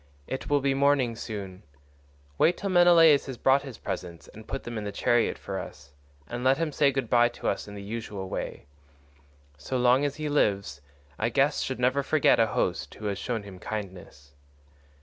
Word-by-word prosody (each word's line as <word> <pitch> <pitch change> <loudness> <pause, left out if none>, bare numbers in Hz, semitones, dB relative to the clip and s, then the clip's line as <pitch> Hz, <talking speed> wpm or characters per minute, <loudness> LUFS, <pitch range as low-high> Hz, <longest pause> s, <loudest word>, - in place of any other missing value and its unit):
It 130 - -5
will 145 -1 +3
be 135 0 +1
morning 135 -4 +2
soon; 100 -5 -7 0.8
wait 170 +2 +4
till 200 -1 -3
Menelaus 170 -5 +6
has 130 -2 -6
brought 135 +3 +3
his 135 -5 -9
presents 85 -2 -6
and 110 0 -13
put 135 - -5
them 120 - -6
in - - -6
the 105 - -4
chariot 120 +3 +1
for - - -5
us; 70 -1 -10 0.3
and 120 +6 -5
let 130 +1 +4
him 165 -1 -1
say 140 -1 +3
good 135 -3 -2
bye 120 0 +4
to 120 - -6
us - - -2
in 105 - -9
the 100 - -8
usual 105 -2 -6
way. - - -5 0.9
So 130 - -3
long 125 +2 +4
as 145 -1 -1
he 155 -1 -4
lives 100 - 0 0.4
a 115 - +1
guest 140 +5 +1
should 130 -2 -4
never 130 +3 +2
forget 145 -2 +3
a 115 - +4
host 85 -5 -1
who 105 - -9
has 100 -1 -2
shown 115 -4 -3
him 95 -2 -11
kindness." 95 -10 -8
120 Hz, 195 wpm, -27 LUFS, 100-140 Hz, 0.9 s, Menelaus